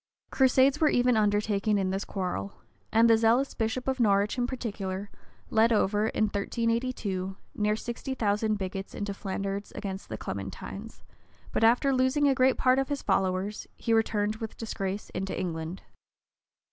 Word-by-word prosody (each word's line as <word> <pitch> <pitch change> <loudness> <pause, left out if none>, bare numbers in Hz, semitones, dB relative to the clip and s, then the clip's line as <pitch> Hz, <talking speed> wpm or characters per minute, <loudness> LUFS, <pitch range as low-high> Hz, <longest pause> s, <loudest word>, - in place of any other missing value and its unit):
Crusades 265 +2 +4
were 310 - +5
even 245 0 +3
undertaken 210 0 +2
in 190 -1 0
this 195 +1 -2
quarrel; 180 - -3 0.4
and 225 +1 +5
the 225 -1 +5
zealous 235 +5 +3
bishop 225 +3 -2
of 265 -1 0
Norwich, 205 -2 +3
in 245 -1 0
particular, 200 -6 -4 0.4
led 225 +1 +4
over, 210 0 +2
in 220 - 0
1382 215 -2 -1 0.2
near 210 0 +1
sixty 240 +4 -5
thousand 215 -1 +1
bigots 195 0 -5
into 205 -1 -3
Flanders 195 0 -4
against 195 -2 -5
the - - -4
Clementines; - - -7 0.5
but - - 0
after 245 +4 +4
losing 260 +3 +3
a 275 - +4
great 260 0 +3
part 255 +1 +4
of 270 - -1
his 285 -1 -2
followers, 190 +1 0
he 230 - -1
returned 215 -1 +1
with 220 -1 -6
disgrace 200 -3 -4
into 190 +1 -3
England. 165 0 -4
215 Hz, 155 wpm, -28 LUFS, 195-245 Hz, 0.5 s, were